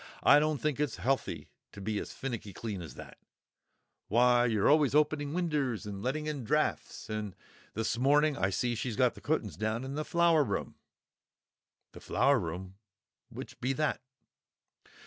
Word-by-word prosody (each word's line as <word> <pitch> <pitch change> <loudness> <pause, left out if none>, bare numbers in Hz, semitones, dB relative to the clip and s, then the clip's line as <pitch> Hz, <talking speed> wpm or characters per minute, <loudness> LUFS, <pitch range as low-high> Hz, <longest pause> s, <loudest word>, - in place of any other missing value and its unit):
I 145 - +7
don't 155 0 +1
think 150 -3 -1
it's 150 -5 0
healthy 135 +1 -2 0.2
to - - -10
be 105 +1 -2
as - - -6
finnicky 120 -7 -5
clean 105 -5 -5
as 80 - -9
that; - - -11 0.9
why, 120 +2 +4
you're 110 -4 +2
always 145 -2 +4
opening 150 -1 +2
winders 150 - -1
and 100 -1 -6
letting 150 +6 -2
in 150 -4 -3
draughts. 150 +6 -1
And 110 -1 -3
now 90 - -17 0.4
this 110 +1 -1
morning 145 +3 +4
I 95 -8 +1
see 120 +5 0
she's 120 0 -3
got 125 +2 +3
the - - -14
cutt'ns 110 - -1
down 110 +3 -1
in 135 +1 -5
the 150 +2 -2
Flower 170 -2 +3
room——" 100 -6 -3 1.2
"The - - -12
Flower 140 -1 +3
room? 90 +2 -6 0.5
Which - - -9
be 130 +2 0
that?" 150 +2 -1
125 Hz, 165 wpm, -31 LUFS, 110-150 Hz, 1.2 s, I